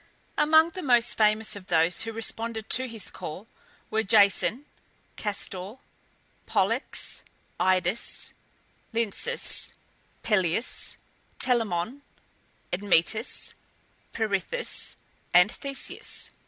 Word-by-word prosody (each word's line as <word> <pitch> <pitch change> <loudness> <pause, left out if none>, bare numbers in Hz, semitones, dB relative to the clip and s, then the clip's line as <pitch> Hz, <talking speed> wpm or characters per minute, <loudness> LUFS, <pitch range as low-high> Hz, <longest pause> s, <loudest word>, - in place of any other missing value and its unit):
Among 315 +2 +5
the 370 - -6
most 240 -5 +4
famous 215 0 +2
of 195 -2 -10
those 165 -1 +2
who 225 - -2
responded 225 0 -2
to 260 0 +5
his 225 -4 -5
call 170 +7 -7 0.5
were 220 0 +2
Jason, 215 +5 +3 0.5
Castor 205 -2 -3
and 195 +7 -8 0.7
Pollux, - - 0 0.4
Idas 185 +3 0 0.6
and 225 -3 0
Lynceus, 485 0 +2 0.5
Peleus, 190 +1 0 0.4
Telamon, 230 0 +1 0.7
Admetus, 200 +4 +1 0.6
Perithous, 220 - -1 0.4
and 180 +4 +7
Theseus. 275 -1 -3
220 Hz, 90 wpm, -27 LUFS, 190-235 Hz, 0.7 s, and